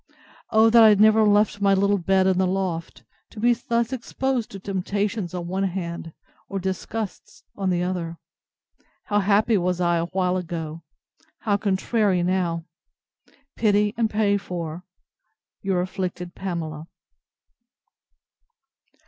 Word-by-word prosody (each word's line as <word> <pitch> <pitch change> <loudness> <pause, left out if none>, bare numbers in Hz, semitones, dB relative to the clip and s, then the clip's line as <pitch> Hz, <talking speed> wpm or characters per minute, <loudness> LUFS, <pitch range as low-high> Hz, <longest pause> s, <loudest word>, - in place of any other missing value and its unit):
O 225 0 +5
that 235 0 +7
I 220 - +9
had 205 -2 +4
never 220 +1 +6
left 205 -1 +3
my 200 -1 +4
little 200 +1 +2
bed 190 +2 +2
in 185 -1 +2
the 190 - +3
loft, 175 -8 -3 0.3
to 215 - -11
be 240 +2 +4
thus 235 +1 -1
exposed 260 -1 -2
to 195 - -9
temptations 200 0 -2
on 175 -1 -4
one 190 +2 -1
hand, 170 -3 -4 0.4
or 195 - -3
disgusts 190 +3 -5
on 195 -2 -1
the 175 -1 +1
other! 175 -2 -3 0.9
How 205 0 +1
happy 205 +2 +3
was 180 0 -1
I 175 -1 +2
awhile 180 +2 0
ago! 165 -2 -5 0.6
How 205 -2 +1
contrary 200 -1 +1
now!—Pity 190 - -2
and 225 -1 +1
pray 205 -1 +2
for 175 -3 -6 0.8
Your 190 -2 0
afflicted 180 -1 -4
PAMELA. 165 -4 -5
190 Hz, 130 wpm, -24 LUFS, 175-210 Hz, 0.9 s, I